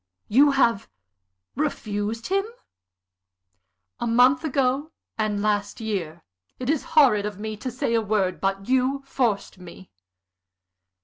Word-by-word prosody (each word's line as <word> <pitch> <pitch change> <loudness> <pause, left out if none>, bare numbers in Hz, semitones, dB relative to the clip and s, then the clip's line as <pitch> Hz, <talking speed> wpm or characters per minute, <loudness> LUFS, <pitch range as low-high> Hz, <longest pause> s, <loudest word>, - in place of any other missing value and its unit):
"You 275 +7 +5
have 235 -7 +2 0.7
refused 225 -6 -3
him?" 390 +1 +1 1.6
"A 240 - -2
month 250 +5 +4
ago, 275 0 0 0.3
and 210 -2 -1
last 205 -1 -1
year. 180 -7 -4 0.3
It 255 +2 -1
is 310 - -1
horrid 215 -9 +5
of 205 -2 -7
me 215 +1 -5
to 255 - -5
say 245 -1 -2
a 230 - +3
word. 200 -4 -1
But 195 0 -1
you 260 +2 +1
forced 230 -8 -1
me." 180 +1 -13
225 Hz, 125 wpm, -24 LUFS, 205-265 Hz, 1.6 s, You